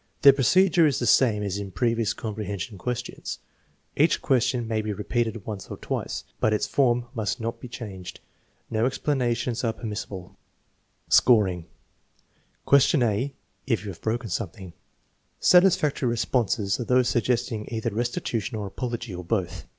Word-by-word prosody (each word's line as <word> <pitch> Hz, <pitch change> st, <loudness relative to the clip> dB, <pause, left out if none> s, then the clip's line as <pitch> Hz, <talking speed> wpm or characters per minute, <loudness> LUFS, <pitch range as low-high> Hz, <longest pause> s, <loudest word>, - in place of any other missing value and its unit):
" -, -, -42 dB
The 140 Hz, -, +10 dB
procedure 170 Hz, +5 st, +4 dB
is 140 Hz, -, +1 dB
the 120 Hz, -, -1 dB
same 110 Hz, -5 st, +4 dB
as 100 Hz, 0 st, -2 dB
in 100 Hz, -1 st, -5 dB
previous 115 Hz, +1 st, 0 dB
comprehension 105 Hz, -3 st, -5 dB
questions. 120 Hz, +1 st, -4 dB, 0.6 s
1 145 Hz, -, +5 dB
Each 160 Hz, -, +3 dB
question 125 Hz, -2 st, +1 dB
may 110 Hz, -1 st, 0 dB
be 110 Hz, 0 st, -3 dB
repeated 110 Hz, 0 st, -2 dB
once 105 Hz, -3 st, -6 dB
or -, -, -6 dB
twice, -, -, -4 dB, 0.2 s
but 110 Hz, -, +2 dB
its 105 Hz, -, +1 dB
form 125 Hz, -3 st, +2 dB
must 110 Hz, -5 st, -2 dB
not 115 Hz, +1 st, -4 dB
be -, -, -7 dB
changed. 95 Hz, -6 st, -8 dB, 0.5 s
No 110 Hz, +2 st, +2 dB
explanations 125 Hz, -4 st, -1 dB
are 115 Hz, -2 st, +1 dB
permissible. 105 Hz, -5 st, -6 dB, 0.7 s
Scoring: 95 Hz, -8 st, +4 dB, 1.0 s
Question 140 Hz, 0 st, +5 dB
a 120 Hz, +5 st, 0 dB, 0.3 s
(If 110 Hz, -6 st, 0 dB
you 100 Hz, -, -4 dB
haw -, -, -16 dB
"broken 115 Hz, -1 st, -2 dB
something) 95 Hz, -2 st, -5 dB, 0.7 s
Satisfactory 170 Hz, -8 st, +4 dB
responses 115 Hz, -3 st, 0 dB
are 120 Hz, -, -3 dB
those 125 Hz, 0 st, +3 dB
suggesting 120 Hz, -2 st, 0 dB
either 115 Hz, 0 st, -2 dB
restitution 115 Hz, 0 st, -2 dB
or 105 Hz, -, -3 dB
apology, 120 Hz, +1 st, -5 dB
or 90 Hz, 0 st, -6 dB
both. 90 Hz, -3 st, -2 dB
115 Hz, 150 wpm, -25 LUFS, 105-125 Hz, 1.0 s, The